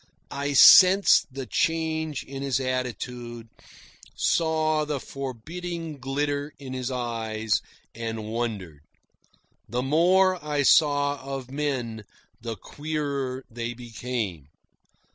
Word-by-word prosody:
I 140 +1 -2
sensed 185 +3 +8
the 135 0 -6
change 160 -1 -1
in 135 0 -8
his 135 -2 0
attitude, 125 -2 -4 0.7
saw 155 -2 +1
the 150 -2 -2
forbidding 155 +6 -6
glitter 145 +2 -2
in 135 -2 -8
his 130 -1 -3
eyes, 110 -4 -1 0.3
and 115 -1 -5
wondered. 105 -9 -4 0.9
The 125 +3 -1
more 180 +5 +3
I 150 -1 0
saw 145 -1 +4
of 135 -1 -6
men, 130 -6 -3 0.4
the 115 -1 -4
queerer 140 0 -4
they 120 +1 -4
became. 115 - -5
135 Hz, 105 wpm, -26 LUFS, 120-150 Hz, 0.9 s, sensed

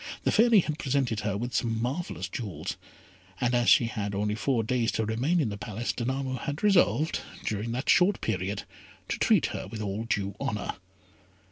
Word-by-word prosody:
The - - +2
Fairy 225 -2 +6
had 155 -1 -4
presented 130 -6 0
her 100 -2 -1
with 120 +3 -4
some 115 0 0
marvellous 125 - -3
jewels, 100 -2 -5 0.6
and 125 0 +1
as 120 -1 +3
she 120 - +6
had 105 -3 -3
only 105 +1 0
four 115 +2 0
days 120 +1 +1
to 110 - 0
remain 130 +11 +1
in 135 -8 +1
the 100 0 -6
palace, 105 +4 -3
Danamo 130 +1 -2
had 145 +5 -4
resolved, 175 -6 +3 0.3
during 110 +2 -2
that 125 +3 -3
short 185 +3 +4
period, 100 -2 -2 0.5
to - - -2
treat - - +4
her - - -5
with 110 - -7
all 105 +1 -3
due 100 -3 -1
honour. 105 - -2
115 Hz, 180 wpm, -28 LUFS, 105-135 Hz, 0.6 s, Fairy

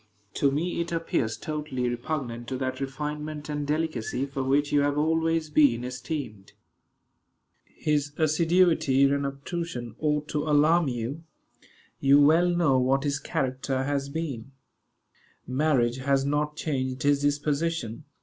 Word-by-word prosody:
To 140 - +2
me 165 +5 -1
it 170 - -4
appears 130 -9 -1
totally 150 -3 -3
repugnant 120 -1 -4
to 130 - -3
that 130 0 -3
refinement 150 +2 -5
and 145 -1 -3
delicacy 150 -5 -1
for 135 -1 -4
which 140 +2 +1
you 145 - +4
have 145 0 +1
always 160 0 +1
been 135 -6 +4
esteemed. 125 -5 -6 1.1
"His 145 -2 -1
assiduity 160 -3 +3
and 140 0 +2
obtrusion 140 - -5
ought 150 -1 0
to 150 - -1
alarm 155 +3 +4
you. 125 +5 -3 0.8
You 140 +1 +5
well 160 +5 +5
know 165 -7 +3
what 135 +2 +2
his 140 -1 -1
character 130 0 -2
has 140 0 -1
been. 140 -5 -5 0.9
Marriage 130 -3 +1
has 135 0 +1
not 150 +1 0
changed 130 -5 -2
his 145 0 +3
disposition. 145 -3 -1
145 Hz, 130 wpm, -27 LUFS, 130-155 Hz, 1.1 s, You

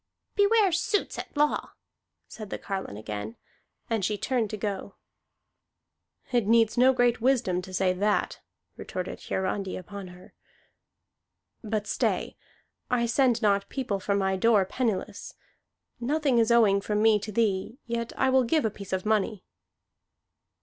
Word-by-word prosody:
"Beware 410 -1 +4
suits 360 +5 0
at - - -8
law," 295 0 +1 0.5
said 215 -3 -9
the - - -4
carline 190 - -5
again, 105 +1 -6 0.5
and 225 -3 -1
she 210 +2 0
turned 240 -2 -1
to 215 - -5
go. 200 -1 -4 1.4
"It 240 -5 +1
needs 225 -1 +4
no 255 +2 +6
great 245 -2 +2
wisdom 230 -8 +2
to 185 - -10
say 185 0 +1
that," 205 +3 0 0.4
retorted 185 -1 -5
Hiarandi 190 0 -2
upon 195 +1 -8
her. 180 +1 -14 1.3
"But 215 -1 -2
stay! 210 - -1 0.5
I 245 -1 +2
send 240 -1 +2
not 200 -1 +2
people 245 -7 -2
from 200 +1 0
my 190 -1 +1
door 210 -1 +4
penniless. 220 -1 -3 0.6
Nothing 275 0 +1
is 225 0 +3
owing 215 -4 +4
from 210 +1 -1
me 220 -1 +5
to 215 +1 -6
thee, 210 +1 0
yet 235 0 -3
I 265 0 +2
will 260 0 +4
give 250 +3 +1
a 220 - +1
piece 200 -2 -8
of 185 +1 -1
money." 215 -2 0
215 Hz, 145 wpm, -27 LUFS, 195-240 Hz, 1.4 s, no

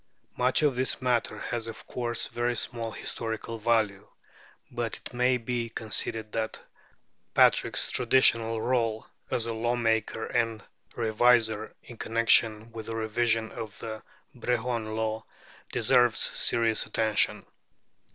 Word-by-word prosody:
Much 125 +4 +2
of 145 -4 +3
this 130 +1 +1
matter 125 -2 0
has 115 -1 -4
of 115 - -8
course 120 -2 -1
very 120 0 -1
small 115 0 -1
historical 115 0 -5
value; 105 -3 +1 0.6
but 120 -3 -3
it - - -11
may 125 +1 +2
be 120 0 -3
conceded 110 -1 -1
that 110 -1 -3 0.8
Patrick's - - +3
traditional 115 -2 +3
rôle 115 -2 0 0.2
as 115 - -1
a 115 - -2
law 120 +2 0
maker 110 -1 0
and 115 -3 -1 0.3
reviser, 110 -1 +2
in 120 - -12
connection 115 -1 +2
with 110 -1 -8
the 115 - -4
revision 115 0 0
of 110 -2 -7
the 110 -1 -6 0.3
Brehon 120 -2 -2
Law, 110 0 -2 0.5
deserves 120 -2 +3
serious 115 -2 +1
attention. 110 -1 +1
115 Hz, 125 wpm, -28 LUFS, 110-120 Hz, 0.8 s, of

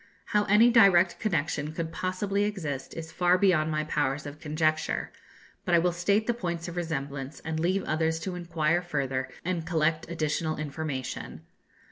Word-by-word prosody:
How 210 -1 +1
any 215 +4 +6
direct 195 -6 +5
connection 155 -6 -1
could 165 0 -3
possibly 195 +3 -1
exist, 155 -10 -4
is 165 0 -6
far 180 +1 +3
beyond 175 -5 +3
my 155 -1 0
powers 145 -2 -1
of 145 +1 -8
conjecture; 155 0 0 0.5
but 175 - +2
I - - +7
will 175 +1 +3
state 200 +5 +1
the 240 - +1
points 170 -7 -4
of 175 - -6
resemblance, 140 -4 -4
and 160 0 -3
leave 185 +4 +1
others 160 +1 0
to 185 - -3
inquire 170 -1 0
further 135 -7 -2 0.2
and 175 -2 -1
collect 160 -1 0
additional 155 -1 -1
information. 145 -3 -5
165 Hz, 160 wpm, -28 LUFS, 155-180 Hz, 0.5 s, I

